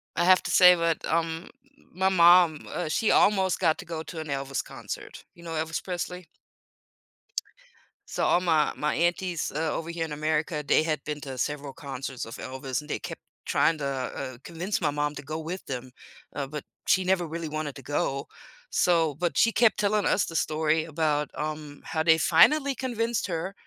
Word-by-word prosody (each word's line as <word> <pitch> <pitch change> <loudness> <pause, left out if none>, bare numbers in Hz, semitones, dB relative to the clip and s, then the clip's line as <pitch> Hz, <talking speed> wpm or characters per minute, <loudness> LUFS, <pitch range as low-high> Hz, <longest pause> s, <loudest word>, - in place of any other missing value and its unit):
I 175 - +1
have 185 0 +6
to - - -3
say 180 -1 +8
that, 165 -1 0
um, 165 +1 -1 0.4
my 190 +2 +1
mom, 175 -3 +5
uh, 155 - -3
she 220 +6 +1
almost 190 -3 +3
got 160 -4 +3
to - - -8
go 165 -2 -5
to 165 - -8
an 155 - -5
Elvis 135 -1 -2
concert, - - -8
you 170 - -16
know, 165 - -7
Elvis 160 +1 -2
Presley? 180 -1 -5 1.8
So - - -2
all - - +4
my 160 -4 +2
my 150 0 0
aunties, 175 0 0
uh, 155 +2 -1
over 165 - -4
here 170 -1 -2
in 150 - -6
America, 155 0 -1
they 145 - +4
had 155 -3 -2
been 150 -1 -4
to 135 -2 -6
several 140 +1 -3
concerts 135 -4 -6
of 115 - -9
Elvis 130 0 -4
and 150 - -11
they - - -2
kept - - -7 0.3
trying 165 - +2
to 140 - -3
uh, - - 0 0.5
uh, - - -15
convince 175 +5 -2
my - - +1
mom 145 0 -1
to - - -6
go 155 +3 -5
with 170 +4 -6
them, 130 -1 -6 0.4
uh, 140 -2 -3
but 150 0 -6 0.2
she 185 - +3
never 180 -2 +1
really 165 0 -5
wanted 155 -2 -4
to - - -9
go, 140 -1 -1 0.4
so 165 -4 +2
but 175 +3 -2
she 230 - +5
kept 230 0 +4
telling 205 0 +1
us 195 - +3
the 165 - -3
story 155 +1 +1
about, 150 -2 0
um, 150 -1 -5
how 160 -1 -2
they 160 0 +5
finally 280 - +5
convinced 235 -2 -1
her, 175 +2 -3
160 Hz, 195 wpm, -27 LUFS, 150-180 Hz, 1.8 s, say